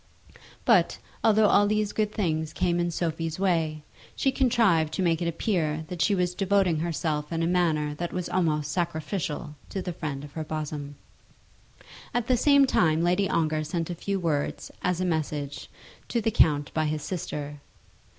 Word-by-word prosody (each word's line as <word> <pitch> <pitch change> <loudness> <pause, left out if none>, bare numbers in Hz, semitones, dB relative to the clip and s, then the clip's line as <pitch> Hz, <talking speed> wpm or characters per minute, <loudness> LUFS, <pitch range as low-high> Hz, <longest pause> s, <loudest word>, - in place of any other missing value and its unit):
But, - - +4 0.3
although 220 -1 +5
all 205 0 +5
these 215 0 0
good 210 -1 0
things 160 -6 -1
came 175 -1 +1
in 175 0 +1
Sophie's 165 -1 -2
way, 165 -5 0 0.3
she 270 - +1
contrived 225 - +2
to 190 - 0
make 165 -2 +1
it 170 - 0
appear 160 -3 -1
that 180 -2 -4
she 200 +6 +3
was 180 -1 0
devoting 190 -3 +2
herself 155 -2 -2
in 165 0 -1
a - - +2
manner 165 -4 +1
that 170 +3 -4
was 180 -1 -3
almost 150 -5 0
sacrificial 165 -2 -3 0.2
to 195 - -3
the 180 -1 -4
friend 150 -4 -5
of 145 - -9
her 160 +1 -4
bosom. 150 -2 -5 1.2
At 245 -2 +1
the 255 - +3
same 280 +3 +5
time 160 -9 +2
Lady 180 +3 +2
Ongar 155 -2 +1
sent 165 +2 -3
a - - -1
few 195 +3 -2
words, 155 -5 -2
as 180 -1 0
a 185 - 0
message, 150 -4 -3 0.4
to 235 - 0
the 225 0 0
count 145 -7 +3
by 155 -1 +1
his 150 0 -2
sister. 150 -3 -5
170 Hz, 175 wpm, -27 LUFS, 155-185 Hz, 1.2 s, although